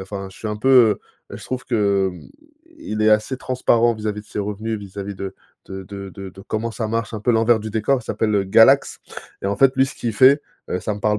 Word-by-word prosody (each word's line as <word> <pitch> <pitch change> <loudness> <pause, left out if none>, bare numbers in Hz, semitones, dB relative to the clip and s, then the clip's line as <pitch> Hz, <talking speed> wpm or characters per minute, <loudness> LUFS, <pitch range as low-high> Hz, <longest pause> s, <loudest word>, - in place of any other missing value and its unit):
enfin 95 0 -6
je - - -16
suis 110 - -5
un 105 - -3
peu, 130 +5 -1
heu 120 -5 +5 0.3
heu - - -6
je - - -11
trouve 130 0 -5
que, 100 -5 +1
hem, - - -12 0.6
i - - -8
il 110 0 -1
est 110 - +4
assez 110 +5 +2
transparent 120 -2 +2
vis-à-vis 105 -1 -4
de - - -26
ses - - -7
revenus, 105 +2 -3
vis-à-vis 100 0 -7
de 95 0 -6 0.3
de 95 0 -7
de 100 +1 -8
de 95 0 -9
de 95 - -14
comment 110 +2 -2
ça 110 0 -4
marche 115 +1 -2
un 110 - -5
peu 120 - +1
l'envers 115 0 +3
du 110 - -6
décor. 115 +5 +1
Il 110 - -16
s'appelle, 105 -2 -1
heu, 100 -1 +2
Galax, 115 +8 +4 0.4
et - - -2
en 100 0 -1
fait 135 +2 +4
lui 135 0 +4
ce - - -9
qu'il 115 -2 -3
fait, 135 +6 +5 0.3
heu, 90 - -2
ça 105 - -2
me - - -8
parle 105 0 +1
110 Hz, 265 wpm, -21 LUFS, 100-115 Hz, 0.6 s, heu